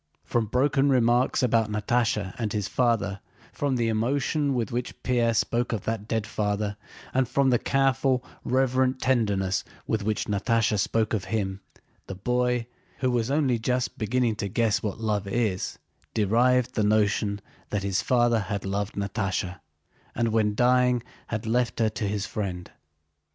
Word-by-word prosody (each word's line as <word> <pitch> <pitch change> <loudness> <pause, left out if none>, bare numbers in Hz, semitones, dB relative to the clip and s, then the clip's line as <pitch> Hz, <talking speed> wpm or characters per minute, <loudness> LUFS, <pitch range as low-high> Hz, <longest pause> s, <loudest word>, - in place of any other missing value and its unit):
From 115 -2 0
broken 135 +4 +2
remarks 125 0 +3
about 115 -3 +2
Natásha 105 -2 0
and 110 -3 -1
his 105 -2 -1
father, 105 -6 +1 0.3
from 140 -2 0
the 120 -2 +1
emotion 135 +5 0
with 115 -4 -1
which 120 +1 -4
Pierre 120 -2 +2
spoke 120 +2 0
of 105 - -3
that 110 -2 -3
dead 110 -2 -1
father, 105 -1 -1 0.4
and 130 -2 +1
from 135 +1 +3
the 120 - +3
careful, 135 -1 +1 0.2
reverent 130 0 +1
tenderness 100 -7 +1 0.2
with 110 - -1
which 105 +1 -1
Natásha 105 +1 +1
spoke 110 +2 +1
of 100 -4 -1
him, 95 -1 -2 0.5
the 95 - -5
boy, 125 +3 0 0.3
who 130 -1 0
was 120 -1 0
only 135 -5 +2
just 125 +2 -1
beginning 115 +1 +1
to 100 - -2
guess 110 +2 +1
what 105 0 -3
love 105 -3 -1
is, 100 -3 -1 0.4
derived 120 +4 +3
the 110 - +1
notion 105 -1 +2 0.3
that 105 -2 -2
his 100 0 0
father 120 -2 +3
had 100 -1 -3
loved 100 +1 -2
Natásha 100 -2 -2 0.6
and 115 0 +1
when 110 -2 +1
dying 125 0 +3 0.2
had 110 -2 -3
left 120 +2 0
her 110 -1 +3
to 105 -1 -3
his 100 0 -2
friend. 90 -4 -4
115 Hz, 155 wpm, -26 LUFS, 105-125 Hz, 0.6 s, remarks